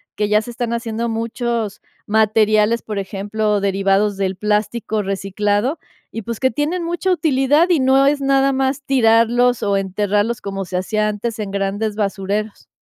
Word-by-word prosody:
que 210 Hz, 0 st, -1 dB
ya 210 Hz, 0 st, +3 dB
se 240 Hz, -, -8 dB
están 235 Hz, 0 st, -3 dB
haciendo 235 Hz, 0 st, -2 dB
muchos 230 Hz, -2 st, -3 dB, 0.2 s
materiales, 215 Hz, +1 st, +3 dB
por 210 Hz, -2 st, -4 dB
ejemplo, 205 Hz, +2 st, -1 dB
derivados 195 Hz, +1 st, +1 dB
del 190 Hz, -1 st, -2 dB
plástico 210 Hz, +1 st, -1 dB
reciclado. 205 Hz, -, -1 dB, 0.3 s
Y 225 Hz, -, -5 dB
pues, 230 Hz, +2 st, -5 dB
que 260 Hz, -1 st, +2 dB
tienen 305 Hz, +8 st, -1 dB
mucha 345 Hz, +2 st, -1 dB
utilidad, 300 Hz, 0 st, +2 dB
y 345 Hz, -4 st, +3 dB
no 265 Hz, +1 st, +4 dB
es 285 Hz, 0 st, +1 dB
nada 275 Hz, 0 st, +2 dB
más 265 Hz, +1 st, -1 dB
tirarlos 240 Hz, -1 st, +3 dB
o 200 Hz, -1 st, +1 dB
enterrarlos, 205 Hz, +3 st, 0 dB
como 195 Hz, -1 st, -4 dB
se 180 Hz, 0 st, -3 dB
hacía 215 Hz, +3 st, 0 dB
antes 220 Hz, +2 st, -4 dB
en 205 Hz, -2 st, -4 dB
grandes 200 Hz, +2 st, -2 dB
basureros. 205 Hz, +1 st, -3 dB
220 Hz, 160 wpm, -19 LUFS, 205-245 Hz, 0.3 s, no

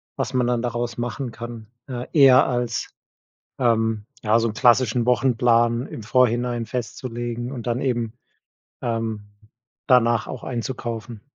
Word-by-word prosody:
was -, -, -3 dB
man 125 Hz, -1 st, +2 dB
dann 120 Hz, -1 st, +1 dB
daraus 120 Hz, -1 st, -3 dB
machen 120 Hz, +1 st, -3 dB
kann. 115 Hz, -2 st, -8 dB, 0.2 s
Äh, 125 Hz, -1 st, -5 dB
eher 135 Hz, -4 st, +7 dB
als, 120 Hz, -3 st, -2 dB, 0.7 s
ähm, 115 Hz, -3 st, +1 dB, 0.2 s
ja, 110 Hz, +1 st, +3 dB
so 115 Hz, 0 st, +1 dB
'n 105 Hz, -, -5 dB
klassischen 120 Hz, 0 st, +3 dB
Wochenplan 120 Hz, -1 st, +3 dB
im 115 Hz, -, -8 dB
Vorhinein 120 Hz, 0 st, +1 dB
festzulegen 120 Hz, 0 st, -4 dB
und 125 Hz, -4 st, -7 dB
dann 120 Hz, +1 st, 0 dB
eben, 120 Hz, -4 st, -1 dB, 0.7 s
ähm, 115 Hz, -2 st, -2 dB, 0.7 s
danach 120 Hz, -3 st, +4 dB
auch 130 Hz, -, -7 dB
einzukaufen? 120 Hz, -3 st, -5 dB
120 Hz, 130 wpm, -23 LUFS, 115-125 Hz, 0.7 s, eher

